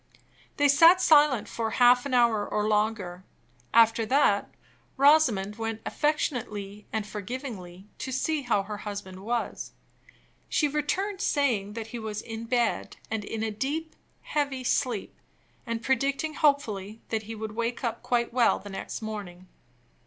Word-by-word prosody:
They 290 - +4
sat 330 +6 +7
silent 295 - +5
for 225 -1 -3
half 245 +3 +4
an 270 - -5
hour 235 -4 +4
or 210 +1 -1
longer. 210 -4 0 0.5
After 230 0 +5
that, 240 -6 +3 0.5
Rosamond 260 -9 +4
went 225 -1 -3
affectionately 210 -9 -2
and 220 -2 -2
forgivingly 205 -4 -7
to 260 - -4
see 300 +4 0
how 235 -6 +1
her 210 +1 -6
husband 200 -3 -7
was. 235 +4 -3 0.8
She 300 - +2
returned, 365 +8 -2
saying 235 - +1
that 225 0 -6
he 240 - -4
was 215 -1 -5
in 225 0 -6
bed, 240 -1 0
and 220 -1 -2
in 220 +2 -4
a 220 - -1
deep, 295 +9 -3 0.3
heavy 280 -3 -2
sleep; 245 -4 -1 0.5
and 230 0 -3
predicting 275 +4 0
hopefully 225 -9 0
that 220 -1 -1
he 225 - -4
would 220 0 -5
wake 235 +3 -3
up 235 -1 -2
quite 235 -1 0
well 240 -2 +4
the 205 - -10
next 195 +3 -6
morning. 190 -4 -7
230 Hz, 145 wpm, -27 LUFS, 210-275 Hz, 0.8 s, sat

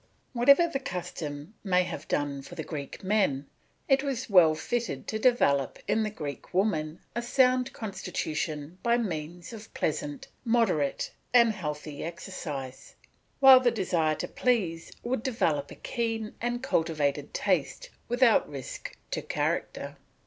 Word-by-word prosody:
Whatever 280 +8 +6
this 280 -5 -3
custom 160 - -5
may 185 -2 +3
have 155 -4 -6
done 145 -1 -1
for - - -11
the - - -4
Greek 145 +1 -7
men, 190 -9 +1 0.4
it 270 0 +4
was 265 -5 -3
well 165 -5 +7
fitted 235 +8 -3
to 220 - -2
develop 180 - +3
in 220 - +2
the 215 - 0
Greek 150 -4 -7
women 165 -5 0
a 235 - 0
sound 255 +1 +3
constitution 160 -5 -4
by 235 0 +3
means 175 -3 -4
of 220 -1 -10
pleasant, 290 -2 -2 0.2
moderate, 225 - +1 0.2
and 235 -2 +7
healthy 150 -6 -5
exercise; 150 -6 -6 0.5
while 265 -1 +10
the 250 -1 +3
desire 175 -8 +1
to - - -4
please 185 -10 0
would 240 -1 -1
develop 160 - 0
a - - -9
keen 225 -2 -3
and 240 +1 -2
cultivated 150 - 0
taste 150 -10 -1 0.2
without 245 -2 +4
risk 135 -3 -7
to - - -1
character. - - -2
190 Hz, 140 wpm, -28 LUFS, 150-240 Hz, 0.5 s, while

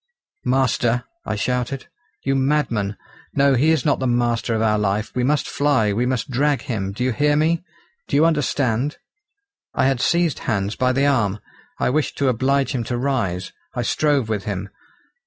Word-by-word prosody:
"Master!" 125 -2 +2 0.2
I - - -1
shouted; 125 +5 -2 0.4
"you 135 - +1
madman! 130 -7 0 0.4
no, 140 0 +4
he 135 +5 +3
is 160 -5 +2
not 145 - +2
the 130 - 0
master 120 -1 +1
of 110 - 0
our 105 -1 +2
life; 105 +2 -1
we 125 - 0
must 145 +3 +1
fly, 140 -8 +2
we 120 +4 0
must 130 0 -2
drag 140 +2 +1
him. 100 -5 -3
Do 105 +5 -3
you 130 - +1
hear 145 +5 +2
me? 160 +3 +2 0.4
Do - - -2
you 150 +3 +5
understand?" 145 -4 +1 0.8
I - - +2
had 135 -2 +1
seized 170 0 +2
Hans 100 0 0
by 130 0 +2
the 135 +2 +2
arm. 110 -8 +2 0.4
I - - +1
wished 155 +2 -1
to 140 -2 +2
oblige 135 +3 +1
him 125 -3 -1
to 120 +2 -2
rise. 115 -9 -1 0.2
I 120 - -1
strove 145 -1 +1
with 105 -3 -2
him. 100 -1 -4
125 Hz, 180 wpm, -21 LUFS, 110-140 Hz, 0.8 s, you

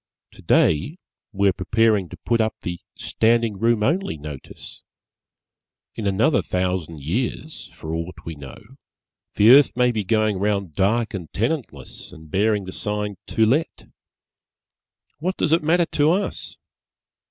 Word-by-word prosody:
Today 80 - +1 0.3
we 100 0 +1
are 95 - +3
preparing 105 0 +1
to - - -10
put 115 -1 +2
up 110 0 -1
the 85 -1 -4 0.2
"standing 115 -2 +1
room 115 -1 +2
only" 170 - 0
notice. 75 -2 -10 1.1
In 105 - -4
another 110 +10 +2
thousand 90 -4 -2
years, 120 - -3
for 80 0 -6
aught 85 +2 -4
we 85 - -5
know, 70 -4 -10 0.8
the 105 +3 +6
earth 135 -1 +6
may 125 0 +3
be 110 -3 -2
going 110 -1 +1
round 100 -4 -1
dark 110 +6 +1
and 90 -6 -6
tenantless 115 - -4
and 80 -1 -14
bearing 105 0 +1
the 95 - -7
sign 105 0 -3
"To 110 - +2
Let." 140 +9 0 1.3
What 185 +4 -2
does 155 - 0
it 165 - +4
matter 170 +3 +3
to 150 -1 +2
us? 190 +5 -2
105 Hz, 140 wpm, -22 LUFS, 90-120 Hz, 1.3 s, the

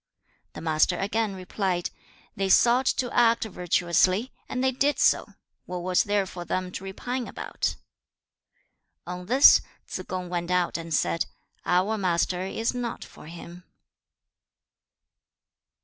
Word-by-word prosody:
The - - -8
Master 160 +2 +2
again 205 0 -1
replied, 185 -1 -2 0.4
'They 195 0 -1
sought 245 +6 +5
to 250 -2 0
act 230 -1 +4
virtuously, 185 +3 +1 0.2
and 255 - -2
they 265 - +3
did 280 +3 +1
so; - - +3 0.4
what 180 -1 -5
was 180 0 +2
there 205 -1 +1
for 175 -1 -7
them 185 +1 -3
to 185 - -7
repine 245 +6 -4
about?' - - -3 1.3
On 180 0 -7
this, 260 +5 +7 0.3
Tsze 185 - -6
kung 185 -1 -4
went 175 0 -3
out 180 -1 +1
and 165 0 -5
said, 165 +2 +1 0.4
'Our 190 +5 +2
Master 180 -1 0
is 225 +6 -2
not 245 -2 -4
for - - -14
him.' 170 +1 -10
185 Hz, 135 wpm, -26 LUFS, 180-225 Hz, 1.3 s, this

